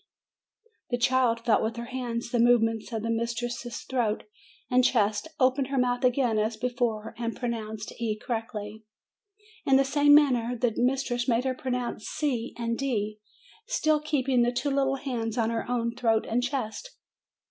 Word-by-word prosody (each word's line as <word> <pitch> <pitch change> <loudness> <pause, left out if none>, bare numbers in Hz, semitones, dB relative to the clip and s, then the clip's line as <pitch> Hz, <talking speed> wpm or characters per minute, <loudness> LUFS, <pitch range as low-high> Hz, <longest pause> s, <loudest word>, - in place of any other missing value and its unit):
The 245 - 0
child 245 -2 +2
felt 225 -3 +4
with 220 +1 -1
her 235 0 -5
hands 235 -2 -4
the 240 - +1
movements 225 -1 +3
of 220 -2 -3
the 230 - -1
mistress's 235 +2 -3
throat 245 -7 -1 0.4
and 255 -1 +3
chest, 210 -3 +2
opened 260 0 +3
her 275 0 -2
mouth 245 0 +1
again 245 -3 +2
as 215 +1 -1
before, 240 -3 -2
and 230 -1 -2
pronounced 220 -3 -4
"e" 220 -2 -1
correctly. 220 -2 -5 0.8
In* 270 - +4
the 270 0 +5
same 290 +1 +5
manner, 250 -5 +3
the 240 -2 +1
mistress 245 -1 0
made 240 -1 +2
her 260 - +1
pro 260 +1 -6
nounce 245 -3 -3
c 255 -6 -2
and 230 -1 -2
d, 215 -6 -1 0.5
still 310 -11 +2
keeping 270 -4 +1
the 240 0 +3
two 280 +3 -1
little 270 -1 +2
hands 240 -4 -3
on 230 -1 +1
her 230 +1 -3
own 235 -1 0
throat 225 -3 +1
and 235 +2 +1
chest. 265 - -4
240 Hz, 170 wpm, -27 LUFS, 225-260 Hz, 0.8 s, the